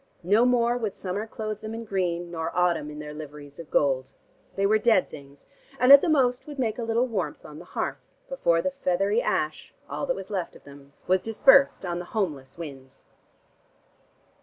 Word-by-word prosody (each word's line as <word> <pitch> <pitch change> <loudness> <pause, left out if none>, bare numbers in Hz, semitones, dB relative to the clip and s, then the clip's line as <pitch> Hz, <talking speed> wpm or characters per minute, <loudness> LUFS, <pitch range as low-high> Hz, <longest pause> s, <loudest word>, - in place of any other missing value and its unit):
No 210 +7 +4
more 240 -1 +2
would 215 -4 -3
summer 200 +4 -4
clothe 215 -1 -5
them 220 +1 -6
in 230 0 -6
green, 175 -4 -2
nor 165 -1 -3
autumn 175 -4 +1
in 150 - -9
their 150 0 -7
liveries 150 -1 -10
of 165 - -9
gold: 135 -2 +1 0.4
they 195 - +1
were 215 +2 +3
dead 220 -4 +3
things 140 -1 -13 0.3
and 250 +2 +5
at 280 0 +11
the 350 - 0
most 255 -4 +2
would 295 -1 -8
make 235 -3 -1
a - - -2
little 230 +2 +1
warmth 190 - -4
on 150 0 -10
the 175 - -12
hearth, 185 - -4 0.3
before 170 - +1
the 280 - 0
feathery 200 -3 0
ash, 155 0 -2
all 280 - -4
that 260 - 0
was 195 +1 -8
left 185 -4 -3
of - - -16
them, 140 0 -15
was 185 0 +2
dispersed 270 +2 +4
on 175 0 -3
the 175 - -6
homeless 145 -10 -2
winds. 135 -5 -10
190 Hz, 195 wpm, -26 LUFS, 155-230 Hz, 0.4 s, at